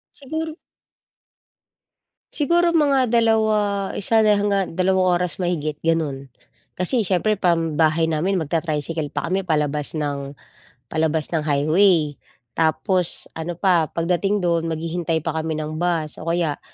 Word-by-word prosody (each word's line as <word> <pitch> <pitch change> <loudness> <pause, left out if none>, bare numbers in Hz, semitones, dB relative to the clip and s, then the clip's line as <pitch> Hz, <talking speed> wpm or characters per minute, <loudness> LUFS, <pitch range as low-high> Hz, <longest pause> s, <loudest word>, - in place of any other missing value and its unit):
Sigur 315 +3 -5 1.8
siguro 340 +3 +2
mga 280 -7 +3
2, 215 -4 +2
1 220 +2 +2
hanggang 205 -2 +2
2 185 -1 +3
oras 180 +1 -3
mahigit 155 -4 -1
ganun. 150 -5 -1 0.5
Kasi 220 +6 +1
siyempre 200 +2 +1
pambahay 165 -3 +2
namin 170 +5 0
magta-tricycle 160 -1 -2
pa 145 0 -3
kami 190 +3 0
palabas 150 -3 -1
ng, 140 -2 -4 0.5
palabas 160 0 0
ng 160 - +1
highway. 155 +2 +3 0.4
Tapos 170 - 0
ano 165 +1 -5
pa, 175 -4 +2
pagdating 180 +5 0
do'n 170 -1 +1
maghihintay 165 0 -2
pa 160 - -1
kami 160 -1 -3
ng 155 +1 -4
bus. 170 -3 -1
O 160 - -6
kaya, 165 -3 0
170 Hz, 120 wpm, -22 LUFS, 155-195 Hz, 1.8 s, mga